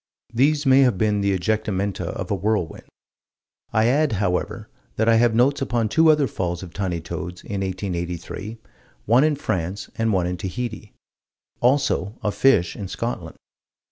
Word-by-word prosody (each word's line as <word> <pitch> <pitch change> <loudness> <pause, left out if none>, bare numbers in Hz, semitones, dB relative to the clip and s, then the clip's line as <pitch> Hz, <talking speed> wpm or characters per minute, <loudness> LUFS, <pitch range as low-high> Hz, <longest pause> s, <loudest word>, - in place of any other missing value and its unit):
These 145 +5 +2
may 135 0 +6
have 125 -7 +4
been 105 0 +1
the 100 0 +1
ejectamenta 100 -2 -1
of 90 - -5
a - - +2
whirlwind. 100 -4 -2 0.9
I 110 0 +3
add, 140 +2 +2
however, 95 -3 -1 0.3
that 110 - +1
I 115 -1 +5
have 115 -1 +3
notes 135 +4 +3
upon 120 -4 0
two 160 +7 +4
other 150 -2 +4
falls 90 -6 -3
of 85 -2 -10
tiny 95 -4 -2
toads, 85 +2 -6
in 100 -2 -4
1883, 95 +2 -4 0.5
one 120 +5 +5
in 155 -1 +3
France 100 - -3
and 115 0 +2
one 95 -3 +1
in 90 0 -2
Tahiti; 110 +3 -5 0.7
also 125 -5 +1
of 105 - 0
fish 110 -11 +3
in 100 - -5
Scotland. 90 -5 -4
105 Hz, 160 wpm, -23 LUFS, 90-120 Hz, 0.9 s, may